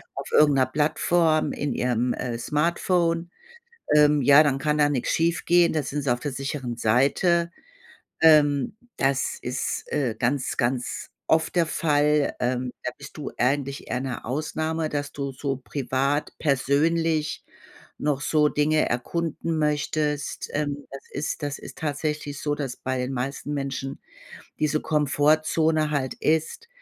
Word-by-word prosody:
auf - - -6
irgend 150 -2 +5
'ner 130 - +4
Plattform 155 +3 +2
in 145 -1 -2
ihrem, 125 0 0
äh, 120 -2 -3
Smartphone. 170 +5 0 0.7
Ähm, 150 -1 +5
ja, 140 +4 +8
dann 140 -3 +1
kann 150 +2 0
da 145 -1 +4
nix 135 -4 -1
schiefgehen, 170 +1 +3
da 155 - 0
sind 145 +1 -3
sie 135 -3 +2
auf 120 - -3
der 145 +1 -3
sicheren 130 -2 -4
Seite. 145 +10 +2 0.7
Ähm, 145 -3 +5 0.2
das 135 0 0
ist, 125 +2 -3
äh, 130 -7 0
ganz, 130 +3 -1
ganz 120 +1 -1 0.2
oft 160 +1 +2
der 170 -1 +4
Fall. 150 -2 +2
Ähm, 125 0 -1
da 125 - -2
bist 140 0 -11
du 150 - -5
eigentlich 140 +2 -1
eher 125 - -1
'ne 130 -2 -5
Ausnahme, 155 +4 -2
dass 145 -1 -3
du 140 -1 -4
so 135 0 -3
privat 135 +2 -1
persönlich 155 +2 +1 0.6
noch 145 -2 0
so 150 0 +3
Dinge 155 +1 +2
erkunden 165 +6 -2
möchtest. 150 -1 -1
Ähm, 145 -1 -2
das 135 0 -9
ist 150 +2 -3
das 145 0 -2
ist - - -11
tatsächlich 150 -1 -3
so, 145 - -1
dass 135 -4 -4
bei 130 0 -3
den 125 +1 -2
meisten 135 +3 -3
Menschen 135 -1 -4 0.6
diese 155 0 +1
Komfortzone 155 +1 +2
halt 130 -3 -1
ist: 160 - -1
145 Hz, 145 wpm, -25 LUFS, 135-155 Hz, 0.7 s, ja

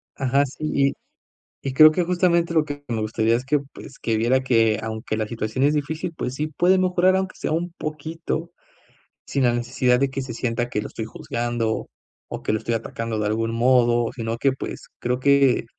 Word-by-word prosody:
Ajá, 135 +1 +2
sí, 140 +3 -7
y 140 0 +2 0.7
y 130 - -2
creo 155 +3 +9
que 175 +2 0
justamente 170 -1 +2
lo 160 -2 +4
que 145 -1 -7
me 115 -2 -2
gustaría 110 +1 +1
es 125 - -2
que, 145 +2 +2 0.2
pues, 135 - -11
que 110 -1 -1
viera 125 +4 +2
que, 115 -4 +3
aunque 110 0 -3
la 110 - -1
situación 115 +3 -2
es 145 +1 +4
difícil, 160 +4 -2
pues 130 -3 -4
sí 150 - -1
puede 175 +5 +2
mejorar 185 0 +3
aunque 190 0 -2
sea - - -3
un 170 +1 -1
poquito, 160 +2 -4 0.7
sin 140 - -1
la 120 -1 +3
necesidad 125 +1 +1
de 135 -1 +1
que 135 0 -3
se 120 -3 -6
sienta 120 0 -1
que 105 - -1
lo 105 - -5
estoy 110 - -5
juzgando, 115 0 -2 0.4
o - - -7
que - - 0
lo 110 - 0
estoy 115 - -2
atacando 115 0 -4
de 105 - -1
algún 115 +2 0
modo, 120 -1 +3
sino 115 -2 -3
que, 135 +3 +2
pues, 130 - -7
creo 125 +1 -1
que 140 -3 +4
130 Hz, 205 wpm, -23 LUFS, 115-155 Hz, 0.7 s, creo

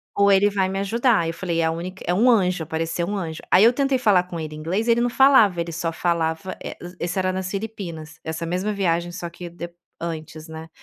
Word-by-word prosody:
ou 200 0 +4
ele 200 +1 +5
vai 190 -2 0
me 195 - -2
ajudar", 220 -2 +2
eu 165 - -2
falei: 170 -1 -2
"É - - +2
a 160 - +1
única 180 +3 -6
é 175 - +2
um 225 +7 +4
anjo, 185 -6 +2
apareceu 165 +2 -2
um 205 - -2
anjo." 160 -4 -5
Aí 190 - +7
eu 235 - +6
tentei 275 0 +1
falar 200 -7 +4
com 175 -2 -7
ele 155 -1 -6
em 155 - -8
inglês, 190 +9 -1
ele 235 0 +4
não 245 - +2
falava, 240 -9 +5
ele 170 0 -4
só 165 0 -2
falava, 165 +1 -1
eh, - - -6
es 175 +1 -9
esse 175 +2 -2
era 185 0 0
nas 185 0 -3
Filipinas, 170 -7 -6
essa 160 +1 -4
mesma 185 +5 -1
viagem 175 -3 0
só 175 0 -6
que 175 +1 -9
de 170 0 -8 0.3
antes, 160 -1 -6
né. 160 0 -9
180 Hz, 245 wpm, -23 LUFS, 165-200 Hz, 0.3 s, Aí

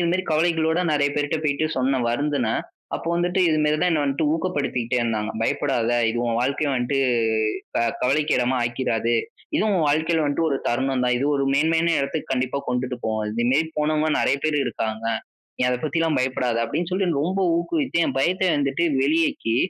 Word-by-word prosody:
இதுமாரி 175 +2 +1
கவலைகளோட 160 +1 +2
நிறைய 145 -1 +2
பேர்ட்ட 145 +2 0
போயிட்டு 150 +1 +1
சொன்னேன் 130 -2 +1
வருந்துனேன். 135 -3 0 0.3
அப்போ - - -5
வந்துட்டு 175 +2 0
இதுமாரி 150 -1 +2
தான் 180 +2 +2
என்ன 155 -3 +1
வந்துட்டு 140 +2 0
ஊக்கப்படுத்திகிட்டே 145 -8 -1
இருந்தாங்க. 110 -2 -1
பயப்படாத! 120 0 0 0.2
இது 115 +1 -1
உன் 115 -1 0
வாழ்க்கை 140 +4 0
வந்துட்டு 130 +2 0 0.6
இப்ப - - -5 0.2
கவலைக்கு 145 +4 +2
இடமா 125 +1 +1
ஆக்கிராது. 120 -1 0 0.4
இதுவும் 215 -1 +1
உன் 160 -4 +2
வாழ்க்கையில 160 +2 +1
வந்துட்டு 145 +3 0
ஒரு 135 - +1
தருணம் 130 +1 0
தான். 125 0 +2
இது 135 - -1
ஒரு 140 - 0
மேன்மையான 165 +3 +2
இடத்துக்கு 140 +2 -3
கண்டிப்பா 130 +1 -1
கொண்டுட்டு 125 0 -2
போவோம். 110 -1 -1
இதுமாரி 125 +8 +1
போனவங்க 155 +1 +1
நிறைய 135 - +2
பேர் 155 -1 +1
இருக்காங்க. 110 0 -3 0.5
நீ - - -2
அத 125 - +1
பத்தில்லாம் 160 +1 0
பயப்படாத! 125 -2 -1
அப்பிடின்னு 170 +8 -3
சொல்லி 190 0 +1
ரொம்ப 185 +5 -1 0.2
ஊக்குவித்து 260 - -1
என் - - -3
பயத்த 185 +6 +1
வந்துட்டு 140 +3 0 0.2
வெளியேற்றி 145 -6 +1
145 Hz, 170 wpm, -23 LUFS, 125-160 Hz, 0.6 s, கவலைகளோட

